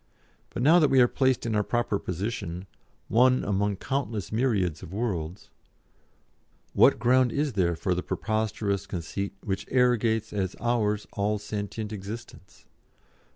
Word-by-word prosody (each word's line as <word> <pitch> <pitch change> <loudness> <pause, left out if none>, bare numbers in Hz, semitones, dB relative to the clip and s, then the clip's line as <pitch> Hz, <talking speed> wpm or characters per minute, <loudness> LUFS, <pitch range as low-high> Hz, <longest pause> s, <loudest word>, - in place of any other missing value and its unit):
But 120 - -4
now 165 +5 +7
that 150 - +4
we 135 - +4
are 120 - +7
placed 130 -1 +1
in 115 - -1
our 105 - +2
proper 120 -3 0
position, 90 -1 -4 0.4
one 130 +3 +4
among 100 0 0
countless 115 -5 -3
myriads 105 - 0
of 90 - -9
worlds, 95 -5 -4 1.2
what - - +5
ground 125 +1 +3
is 145 0 -1
there 90 -4 +1
for 90 +2 -1
the 90 - -1
preposterous 110 -2 -2
conceit 100 +3 -4
which 95 -2 -3
arrogates 115 -4 +2
as 95 -3 -2
ours 105 -4 0
all 105 -1 0
sentient 105 +1 -5
existence? 105 -1 -9
105 Hz, 140 wpm, -27 LUFS, 100-120 Hz, 1.2 s, now